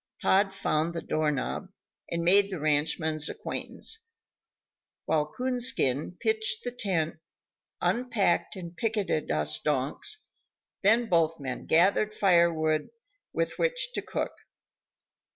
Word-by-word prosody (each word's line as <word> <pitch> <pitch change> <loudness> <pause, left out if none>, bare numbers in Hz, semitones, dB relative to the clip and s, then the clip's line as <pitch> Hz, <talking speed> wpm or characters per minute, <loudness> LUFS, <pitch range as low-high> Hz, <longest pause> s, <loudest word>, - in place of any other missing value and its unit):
Pod 195 +1 +3
found 170 -3 -1
the 165 - -2
doorknob, 155 +4 -1 0.4
and 170 0 -2
made 195 +3 +5
the 185 -4 -4
ranchman's 155 +1 +1
acquaintance, 445 0 -4 1.0
while 150 -1 +1
Coonskin 240 - +1
pitched 440 +1 0
the 245 - -3
tent, 190 -10 -1 0.6
unpacked 235 -7 +1
and 175 -2 -8
picketed 210 -9 -1
us 75 0 +1
donks, 150 - -1 0.5
then 225 +4 +4
both 165 -4 +2
men 130 -3 -5
gathered 200 +5 +3
fire 170 -4 +5
wood 155 -1 0 0.4
with - - -2
which - - 0
to - - -2
cook. - - -3
175 Hz, 115 wpm, -28 LUFS, 155-225 Hz, 1.0 s, made